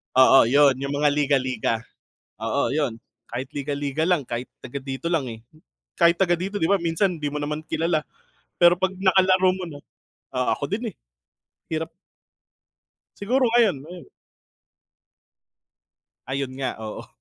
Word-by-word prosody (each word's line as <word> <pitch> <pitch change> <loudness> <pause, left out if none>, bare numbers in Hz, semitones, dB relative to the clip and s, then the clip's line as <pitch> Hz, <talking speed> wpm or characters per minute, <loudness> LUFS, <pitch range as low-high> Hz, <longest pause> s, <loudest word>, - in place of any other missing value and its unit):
Oo, 130 -1 +7
yun 140 +1 +5
yung 140 +1 -3
mga 145 +1 +3
liga-liga, 135 -5 +1 0.7
oo, 115 +6 0
yun, 140 -7 -1 0.3
kahit 125 +3 -4
liga-liga 145 +1 -2
lang 170 -8 +1
kahit 120 +1 -5
taga 130 +2 -7
dito 135 +3 -5
lang, 160 -7 0
eh, 115 - -8 0.6
kahit 170 0 +4
taga 180 -2 +3
dito 190 +4 -3
'di 160 - +1
ba, 200 -1 +3
minsan 170 +1 0
di 145 - 0
mo 150 - -3
naman 150 +1 -3
kilala 165 -1 0 0.6
pero 175 0 +7
pag 190 0 +1
nakalaro 190 -1 +4
mo 185 -1 -5
na, 145 -3 -9 0.6
oo, 125 0 0
ako - - -6
din, 225 +2 -3
eh, - - -43 0.7
hirap. 160 0 -3 1.3
Siguro 245 +4 +1
ngayon, 225 - +3
ngayon. 175 +4 -11 2.2
Ayun 135 0 -2
nga, 130 -2 -2
oo. 110 - -7
150 Hz, 145 wpm, -24 LUFS, 135-180 Hz, 2.2 s, Oo